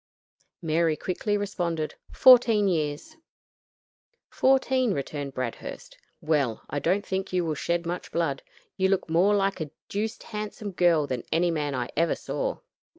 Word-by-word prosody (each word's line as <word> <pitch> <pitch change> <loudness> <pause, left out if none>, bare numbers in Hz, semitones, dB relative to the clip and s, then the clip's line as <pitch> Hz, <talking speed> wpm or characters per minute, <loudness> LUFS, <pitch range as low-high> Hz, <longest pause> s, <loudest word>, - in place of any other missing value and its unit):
Mary 160 -1 +1
quickly 205 +5 -1
responded, 175 -6 -2 0.2
"Fourteen 235 -5 +6
years." 160 - -2 1.1
"Fourteen," 260 -3 +2
returned 140 0 -4
Bradhurst: 125 -3 -5 0.3
"well, 140 -8 0
I 145 - -1
don't 190 +7 0
think 190 0 -3
you 180 -2 +1
will 160 - -1
shed 170 +3 -1
much 175 +1 -4
blood. 155 -5 -1 0.4
You 190 -1 +2
look 195 -2 +1
more 190 +5 +4
like 195 -3 0
a 155 - -3 0.2
deuced 215 +2 -3
handsome 210 -1 -5
girl 175 -4 +3
than 130 -3 -3
any 170 +2 +2
man 145 -3 -2
I 125 -1 -2
ever 165 +2 +2
saw." - - -3
175 Hz, 145 wpm, -26 LUFS, 155-205 Hz, 1.1 s, Fourteen